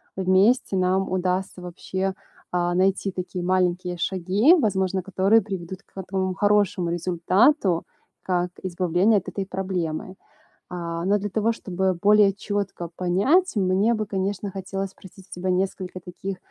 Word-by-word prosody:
вместе 195 +5 +3
нам 185 +1 +1
удастся 185 0 -1
вообще, 185 +2 -3 0.4
э, 175 0 +1
найти 190 +1 +1
такие 180 -1 -5
маленькие 180 -1 0
шаги, 190 - +3
возможно, 190 - 0
которые 195 +4 +3
приведут 190 -2 -6
к - - -37
в - - -6
этому 190 0 -2
хорошему 205 -4 +2
результату, 180 - +2 0.4
как 180 -1 0
избавление 185 +3 +2
от 195 - -4
этой 195 -1 -4
проблемы. 185 -2 -3 0.5
А, 170 -1 -4
но 205 +2 +3
для 205 +1 -3
того 220 +3 +1
чтобы 190 -2 -1
более 200 +2 +4
четко 200 -3 -4
понять, 220 - +2
мне 195 +3 +2
бы, 215 -1 -2
конечно, 195 0 -3
хотелось 195 0 -4
спросить 190 0 -16
у - - -33
тебя 180 +1 -3
несколько 185 0 -2
таких, 180 +2 -6
190 Hz, 140 wpm, -24 LUFS, 180-200 Hz, 0.5 s, более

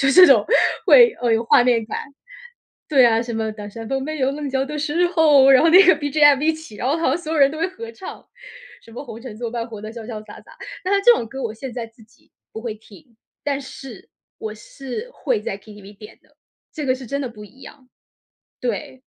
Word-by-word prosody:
就 270 -1 +3
这 365 +6 +8
种 - - +5 0.4
会， 480 -2 +7
呃， 235 - +2
有 225 +1 +1
画 250 +1 +5
面 235 -3 +1
感。 - - -4 0.9
对 270 -5 +5
啊， 225 -1 +3
什 235 0 -5
么 220 0 -2
当 210 -1 -9
山 225 +2 -9
峰 270 +1 -1
没 310 0 -5
有 265 0 +1
棱 290 0 -5
角 265 0 -1
的 300 +2 -6
时 330 +4 0
候， 300 -6 +5
然 265 -2 +7
后 330 - +4
那 370 +3 +8
个 370 - +7
BGM 290 -1 +3
一 320 +1 +2
起， 315 -9 -11
然 250 - -3
后 290 - +1
好 330 - -1
像 335 - 0
所 320 -2 -6
有 325 - -1
人 275 -1 +5
都 310 - -7
会 330 - 0
合 455 +5 -9
唱。 380 - -10 0.6
什 230 - -18
么 265 - -8
红 230 -2 -10
尘 235 -4 -9
作 235 0 -5
伴 235 0 -4
活 215 -3 -9
得 215 +1 -8
潇 230 -2 -9
潇 215 -3 -7
洒 210 - -13
洒， - - -18 0.3
但 385 - +1
是 400 - +2
这 485 +3 +7
种 235 - -2
歌 270 +1 -7
我 230 - -3
现 245 +3 -8
在 235 -1 -5
自 225 -1 -21
己 215 - -29 0.2
不 220 - -7
会 225 -3 -4
听， 230 +3 -19 0.3
但 285 -1 -2
是， 260 -4 -11 0.3
我 215 -1 -6
是 270 - -8
会 - - -2
在 195 - -5
KTV 205 -1 -14
点 210 0 -14
的， - - -31 0.4
这 300 -3 -5
个 255 - +2
是 260 -1 -10
真 280 +3 -3
的 260 - -3
不 210 -2 -12
一 260 +6 -18
样。 260 -3 -14 0.7
对。 245 +2 -5
265 Hz, 275 characters per minute, -21 LUFS, 225-300 Hz, 0.9 s, 这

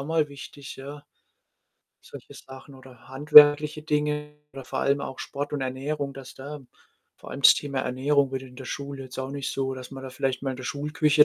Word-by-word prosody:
auch 140 - -6
mal 160 -2 +1
wichtig, 140 0 -10
ja. 140 +2 -9 1.0
Solche - - -12
Sachen 135 +1 -12
oder 130 -3 -16
handwerkliche 150 +2 +7
Dinge 150 -1 -1 0.2
oder 135 -1 -9
vor - - -3
allem 140 +1 +2
auch 130 - -6
Sport 145 +1 -5
und 140 - -2
Ernährung, 140 +2 -3
dass 135 -1 -11
da 145 +2 -8 0.6
vor - - -12
allem 135 - -6
das - - +9
Thema 140 -2 -4
Ernährung 135 +2 +1
wird 130 -1 -4
in 125 -1 -13
der 130 -1 -9
Schule 140 0 -6
jetzt 130 0 -10
auch 130 0 -3
nicht 140 -1 -4
so 135 -1 -2
dass 130 -1 -9
man 135 -1 -9
da 130 - -7
vielleicht 130 0 -2
mal 135 - -1
in 130 - -5
der 130 - -8
Schulküche 150 +2 +3
140 Hz, 210 wpm, -26 LUFS, 130-145 Hz, 1.0 s, das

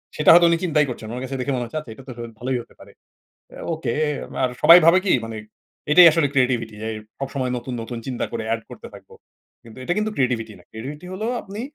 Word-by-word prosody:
সেটা 150 - +2
হয়তো 175 +1 +7
উনি 170 - +3
চিন্তাই 150 -4 +2
করছেন 120 -3 -7
না। - - -7
ওনার 125 +1 -5
কাছে 135 +1 -5
দেখে 140 - -2
মনে 125 - -2
হচ্ছে 120 +7 -6
"আচ্ছা 150 -7 -11
এটা 135 - -14
তো - - -7
হ - - -11 0.2
ভালোই 130 +1 -1
হতে - - -18
পারে।" - - -15 0.6
অ্যা - - -11
ওকে 135 -7 -3 0.5
আর 130 - +1
সবাই 170 +1 +10
ভাবে 170 +2 +7
কি - - +3
মানে 115 -1 -7 0.5
এটাই 175 +3 +9
আসলে 160 -2 +2
creativity 125 -4 +1
যেই 110 0 -3 0.3
সবসময় 135 -2 -3
নতুন, 125 +1 -6
নতুন 120 +1 -6
চিন্তা 130 -2 -3
করে 115 -1 -3
অ্যাড 115 0 0
করতে - - -10
থাকব। - - -15 0.5
কিন্তু 115 +1 -13
এটা 175 - -1
কিন্তু 215 0 -1
creativity 120 -4 -1
না। 90 - -20
creativity 140 +9 -8
হলো 205 +4 -4 0.2
আপনি 200 +2 -8
130 Hz, 230 wpm, -22 LUFS, 115-155 Hz, 0.6 s, সবাই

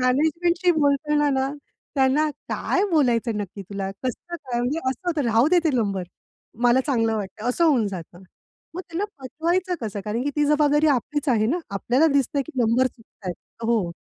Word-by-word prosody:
मॅनेजमेंटशी 330 +7 +2
बोलताना 295 -1 +2
ना, 265 0 0 0.4
त्यांना 275 +3 +3 0.2
काय 385 - 0
बोलायचं, 240 -8 +2
नक्की 200 0 -6
तुला 195 0 -5
कसं 345 +8 -4
काय 250 -7 -4
म्हणजे 255 +6 -1
असं 265 +8 -5
होतं, 320 -4 0
राहूदे 250 +11 +4
ते 315 - +3
नंबर. 200 -6 0 0.6
मला 245 +2 +5
चांगलं 225 -5 +1
वाटतंय 210 +3 -4
असं 295 +7 +2
होऊन 265 -9 +3
जातं. 175 -1 -8 0.5
मग 360 - -4
त्यांना 335 +4 -2
पटवायचं 340 +7 -1
कसं 210 -3 -4
कारण 220 +3 -2
की 290 - 0
ती 295 - +3
जबाबदारी 295 0 +3
आपलीच 290 +2 0
आहे 220 -3 +3
ना. 305 +10 +1
आपल्याला 245 +10 +2
दिसतंय 280 0 +1
की 320 - -10
नंबर 235 +3 +3
चुकतायेत. 220 -7 -8 0.3
हो, 225 -6 +1
260 Hz, 165 wpm, -24 LUFS, 225-305 Hz, 0.6 s, मला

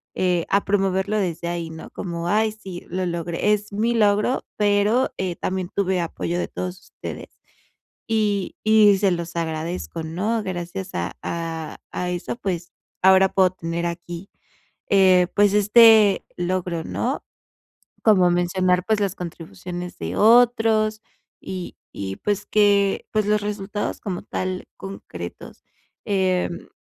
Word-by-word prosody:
eh, 180 -2 +1
a 200 +1 +2
promoverlo 195 +1 +1
desde 170 -3 -2
ahí, 170 -1 -3
¿no?, 160 - -9
como: 170 -2 -4
"Ay 215 +2 +2
sí, 190 -5 -9
lo 185 0 -2
logré, 170 +3 0
es 210 0 -3
mi 225 +4 +1
logro, 210 +3 +2
pero, 210 +4 +2
eh, 185 -2 -2
también, 185 0 -3
eh, - - -38
tuve 190 -2 +1
apoyo 170 +1 -3
de - - -1
todos 185 0 -5
ustedes", - - -9 0.8
y 210 -3 0
y 215 -2 +6
se 195 -1 +3
los 170 0 -4
agradezco, 165 +1 -3
¿no?, 200 +8 -1
gracias 180 +1 -5
a 85 0 -2
a 165 -1 -4
a 180 0 -2
eso, 180 +5 -4
pues, 180 -5 -4 0.3
ahora 190 0 +6
puedo 190 -1 +4
tener 170 -1 -3
aquí, 170 +2 -6 0.6
eh, 185 -2 +5
pues, 205 -1 +4
este 210 0 +6
logro, 175 -2 -2
¿no?, - - -2 0.8
como 190 -5 +5
mencionar, 180 +1 +1
pues, 220 -1 +1
las 195 -1 0
contribuciones 175 +1 -7
de - - -4
otros, 225 -2 +4 0.4
y 185 -2 -6 0.2
y 95 -1 -4
pues 205 0 -2
que, 200 -2 +3
pues, 215 -1 +1
los 210 0 +2
resultados 205 0 -3
como 185 -3 -4
tal 185 0 -3
concretos. 90 - -9 0.4
Em, 185 -3 0
190 Hz, 140 wpm, -23 LUFS, 175-205 Hz, 0.8 s, y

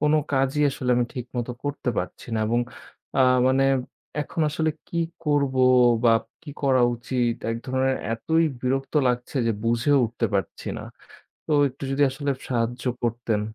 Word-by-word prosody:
কোনো 150 +1 +3 0.2
কাজই 135 +2 +2
আসলে 130 -2 -2
আমি 120 - +3
ঠিকমত 125 -1 -4 0.2
করতে 145 -2 -3
পারছি 90 - -5
না - - 0
এবং 120 +2 +2 0.6
আ - - +5 0.3
মানে 135 +1 +3 0.6
এখন 150 - -4
আসলে 155 +1 0 0.2
কি 170 - -3 0.3
করব 145 -3 +1 0.5
বা 115 - +7 0.3
কি 150 - -8
করা 130 -2 +3
উচিত? 120 0 -1 0.2
এক 115 - -1
ধরনের 130 0 +1 0.2
এতই 160 +9 +1 0.2
বিরক্ত 135 +2 -1
লাগছে 125 +3 -2
যে 115 - +2
বুঝেও 120 +5 +3
উঠতে 115 0 -2
পারছি 95 - -2
না। - - -7 0.6
তো - - -4 0.2
একটু 135 +2 -11
যদি 135 +1 0
আসলে 140 +2 -2 0.2
সাহায্য 120 0 -1 0.2
করতেন? 115 -2 0
130 Hz, 155 wpm, -24 LUFS, 120-140 Hz, 0.6 s, বা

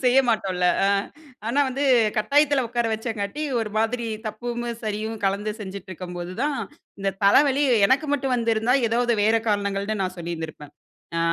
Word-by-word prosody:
செய்ய 250 +2 +5
மாட்டோன்ல. 185 -5 +1 0.2
அ - - +4 0.6
ஆனா 270 +5 +2
வந்து 270 +2 -3 0.3
கட்டாயத்தில 285 +4 +3
உட்கார 240 0 0
வச்சதுனால 220 +4 -3 0.2
ஒரு 215 -2 -3
மாதிரி 230 +1 0 0.2
தப்பும் 240 +2 -4 0.2
சரியும் 215 +1 -3
கலந்து 200 +2 0
செஞ்சுட்டு 195 -1 -7
இருக்கும்போது 180 0 -6
தான், 290 -1 0 0.4
இந்த 195 0 +1
தலவலி 280 +7 +5 0.2
எனக்கு 275 +6 +2
மட்டும் 270 -2 0
வந்திருந்தா 230 +1 +1
எதாவது 240 +1 +1
வேற 220 +2 +4
காரணங்கள்னு 200 0 -1
நான் 185 0 -3
சொல்லியிருந்திருப்பேன். 160 -3 -6 0.4
அ, - - +1
220 Hz, 145 wpm, -24 LUFS, 195-245 Hz, 0.6 s, செய்ய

